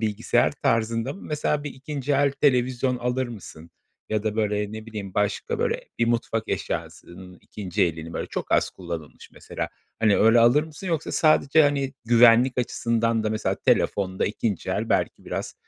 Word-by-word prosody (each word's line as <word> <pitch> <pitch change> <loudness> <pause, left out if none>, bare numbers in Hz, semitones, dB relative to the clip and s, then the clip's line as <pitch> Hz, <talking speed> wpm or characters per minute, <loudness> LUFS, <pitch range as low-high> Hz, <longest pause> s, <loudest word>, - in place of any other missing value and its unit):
bilgisayar 105 -2 +1
tarzında 115 +2 0
mı? 195 - -12
Mesela 150 -1 -1
bir 145 - -4
2'nci 140 +1 -4
el 140 0 +3
televizyon 130 -2 +1
alır 125 +1 -1
mısın? 85 -7 -11 0.4
Ya 110 -1 -1
da, 110 -1 -2
böyle, 105 -1 -1
ne 110 0 -8
bileyim 105 -4 -7
başka, 105 -1 -1
böyle, - - 0 0.2
bir 115 - +2
mutfak 115 -2 -1
eşyasının 90 +1 -5
2'nci 100 0 -3
elini, 80 -2 -2
böyle, - - -4
çok - - -4
az - - +3
kullanılmış 85 -4 -8
mesela, - - -6 0.3
hani, 110 -2 +3
öyle 115 +2 +5
alır 120 +6 +5
mısın? 160 +4 -9
Yoksa 165 -3 -2
sadece, 155 -1 +4
hani, 140 -2 +1
güvenlik 120 +2 +5
açısından 115 -2 0
da 110 - 0
mesela 110 0 -1
telefonda 95 -2 +1
2'nci 105 -2 -2
el - - -2
belki - - 0
biraz, - - -5
115 Hz, 165 wpm, -24 LUFS, 105-130 Hz, 0.4 s, öyle